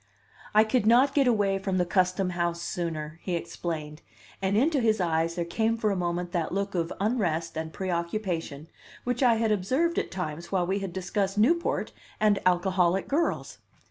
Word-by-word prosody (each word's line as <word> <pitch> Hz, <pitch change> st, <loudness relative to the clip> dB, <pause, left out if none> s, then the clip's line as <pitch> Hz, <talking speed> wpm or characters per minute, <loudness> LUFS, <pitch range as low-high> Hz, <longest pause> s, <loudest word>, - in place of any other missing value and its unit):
"I 215 Hz, -, +8 dB
could 220 Hz, 0 st, +1 dB
not 250 Hz, +5 st, +5 dB
get 275 Hz, -3 st, +3 dB
away 200 Hz, -4 st, +2 dB
from 190 Hz, -1 st, -1 dB
the 180 Hz, -, +2 dB
Custom 185 Hz, +1 st, +1 dB
House 170 Hz, -1 st, -1 dB
sooner," 160 Hz, -3 st, -4 dB
he 180 Hz, -, -2 dB
explained; 165 Hz, -2 st, -5 dB, 0.4 s
and 195 Hz, +2 st, +1 dB
into 285 Hz, +4 st, +3 dB
his 220 Hz, -2 st, +2 dB
eyes 165 Hz, -1 st, 0 dB
there 170 Hz, -1 st, -1 dB
came 225 Hz, +6 st, 0 dB
for 215 Hz, -2 st, +1 dB
a -, -, 0 dB
moment 175 Hz, -1 st, -2 dB
that 170 Hz, -2 st, -1 dB
look 200 Hz, +1 st, -2 dB
of 170 Hz, -2 st, -1 dB
unrest 180 Hz, -7 st, 0 dB
and 160 Hz, 0 st, -4 dB
preoccupation 170 Hz, -4 st, -3 dB, 0.4 s
which 245 Hz, +1 st, -2 dB
I 245 Hz, -3 st, +5 dB
had 225 Hz, -1 st, +1 dB
observed 260 Hz, -, +1 dB
at -, -, -3 dB
times 170 Hz, -2 st, -5 dB
while 185 Hz, -2 st, +1 dB
we 190 Hz, +3 st, 0 dB
had 195 Hz, -2 st, -4 dB
discussed 190 Hz, +2 st, -2 dB
Newport 335 Hz, +11 st, +2 dB, 0.3 s
and 210 Hz, -2 st, +3 dB
alcoholic 185 Hz, 0 st, +2 dB
girls. 320 Hz, +4 st, -1 dB
190 Hz, 175 wpm, -27 LUFS, 170-215 Hz, 0.4 s, I